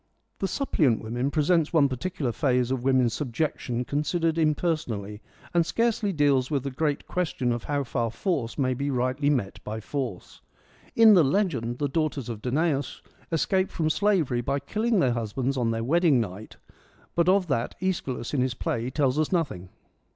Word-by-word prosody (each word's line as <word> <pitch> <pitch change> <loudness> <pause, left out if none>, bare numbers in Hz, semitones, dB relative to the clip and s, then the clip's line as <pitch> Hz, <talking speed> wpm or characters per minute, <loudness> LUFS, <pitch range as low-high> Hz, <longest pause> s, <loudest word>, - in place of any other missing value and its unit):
The 195 - 0
Suppliant 155 - +1
Women 120 +5 -1
presents 155 +1 +2
one 150 -4 +5
particular 135 +1 -3
phase 125 -1 +1
of 130 -2 -1
women's 130 -3 +3
subjection 125 -2 -2
considered 160 +4 0
imperson 155 -4 +1
ally, 100 +1 -7 0.4
and 170 -1 +4
scarcely 225 +2 0
deals 140 -5 +2
with 140 -4 -1
the 140 - -3
great 145 +2 -1
question 160 -9 -1
of 120 -1 -3
how 145 -1 -1
far 120 -2 -1
force 130 - -2
may 130 -3 +1
be 140 +3 -2
rightly 130 +2 0
met 125 -10 -1
by 110 +1 -5
force. 120 -5 -5 0.5
In 225 -1 +8
the 180 -5 +6
legend 135 - 0
the 145 - 0
daughters 140 -3 -2
of 110 -2 -5
Danaus 140 +2 -1 0.3
escape 185 +4 +1
from 155 -2 0
slavery 170 -11 +1
by 140 +4 -1
killing 215 +9 0
their 125 -3 +2
husbands 120 +4 -2
on 120 -3 0
their 115 0 -1
wedding 160 0 +3
night, 105 -1 -5 0.6
but 170 +1 +2
of 190 0 +4
that 120 -4 -1
iEschylus 150 -10 -2
in 135 - +1
this 130 -1 0
play 120 0 -2
tells 135 0 +1
us 155 - 0
nothing. 140 - -1
140 Hz, 175 wpm, -26 LUFS, 120-165 Hz, 0.6 s, In